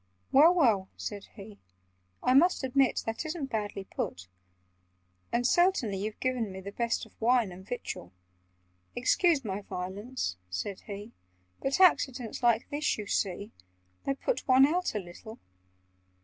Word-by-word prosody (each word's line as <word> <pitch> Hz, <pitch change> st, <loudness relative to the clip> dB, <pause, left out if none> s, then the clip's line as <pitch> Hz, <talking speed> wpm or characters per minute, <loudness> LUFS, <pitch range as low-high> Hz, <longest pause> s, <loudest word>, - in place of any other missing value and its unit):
"Well, 305 Hz, +5 st, +8 dB
well!" 220 Hz, -, +3 dB
said 205 Hz, -2 st, -6 dB
he. 205 Hz, -1 st, -11 dB, 0.6 s
"I 255 Hz, -, +3 dB
must 330 Hz, +3 st, +4 dB
admit 265 Hz, 0 st, +2 dB
That 225 Hz, +4 st, -3 dB
isn't 310 Hz, -4 st, -4 dB
badly 205 Hz, -3 st, -3 dB
put. 95 Hz, -, -5 dB, 1.0 s
"And 240 Hz, +1 st, +1 dB
certainly 345 Hz, -, +3 dB
you've 210 Hz, +2 st, -4 dB
given 250 Hz, -5 st, -1 dB
me 190 Hz, -, -7 dB
The 195 Hz, +1 st, -7 dB
best 235 Hz, +2 st, -1 dB
of -, -, -19 dB
wine 235 Hz, -3 st, +3 dB
and 180 Hz, +1 st, -10 dB
victual— 195 Hz, -, -6 dB, 0.8 s
Excuse 280 Hz, +3 st, +2 dB
my 200 Hz, 0 st, -3 dB
violence," 190 Hz, -, -4 dB
said 95 Hz, -, -4 dB
he, 205 Hz, +2 st, -7 dB, 0.5 s
"But 275 Hz, +6 st, 0 dB
accidents 265 Hz, -, +3 dB
like 235 Hz, -1 st, +3 dB
this, 295 Hz, +1 st, 0 dB
you 210 Hz, -, -5 dB
see, 200 Hz, 0 st, -2 dB, 0.6 s
They 275 Hz, -, +1 dB
put -, -, -2 dB
one 260 Hz, 0 st, +7 dB
out 350 Hz, -2 st, 0 dB
a -, -, +1 dB
little. 195 Hz, +5 st, -10 dB
230 Hz, 145 wpm, -29 LUFS, 200-270 Hz, 1.0 s, Well